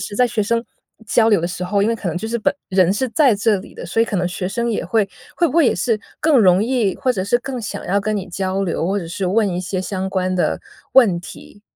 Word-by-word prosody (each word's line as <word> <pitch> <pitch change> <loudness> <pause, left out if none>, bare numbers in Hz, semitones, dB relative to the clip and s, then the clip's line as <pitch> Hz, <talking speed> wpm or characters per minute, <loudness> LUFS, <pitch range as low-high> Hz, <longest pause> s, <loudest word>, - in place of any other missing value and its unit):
时 205 +1 -6
在 250 - +4
学 225 -3 -1
生 230 +3 0 0.4
交 225 +1 +3
流 205 -5 +4
的 170 - -1
时 180 +1 -5
候， 200 +3 0
因 205 - +2
为 230 - +1
可 205 -5 -4
能 170 - -3
就 220 - -5
是 235 +1 -1
本 215 - +1 0.2
人 185 -1 +3
是 255 +5 -1
在 270 +1 +4
这 210 0 +2
里 185 - -10
的， - - -8
所 225 +6 +1
以 - - +3
可 205 - -3
能 180 - 0
学 180 +1 -3
生 235 +4 -2
也 220 - -1
会 200 +3 +1 0.3
会 345 - +3
不 305 - -3
会 330 - +6
也 - - +3
是 225 -4 0 0.2
更 310 -3 +3
容 190 -3 +5
易 230 -6 0
或 255 -2 +1
者 185 - -2
是 205 +5 +2
更 255 -1 -5
想 210 - -6
要 200 +2 +1
跟 215 +1 -1
你 190 -1 -5
交 190 +2 -2
流， 170 -2 -2
或 200 +2 0
者 170 - -6
是 185 +3 -3
问 205 +3 +2
一 180 0 -2
些 185 0 -3
相 190 0 -3
关 185 -1 -1
的 180 - 0 0.3
问 210 -10 +5
题？ 205 +3 -12
200 Hz, 300 characters per minute, -19 LUFS, 185-230 Hz, 0.4 s, 会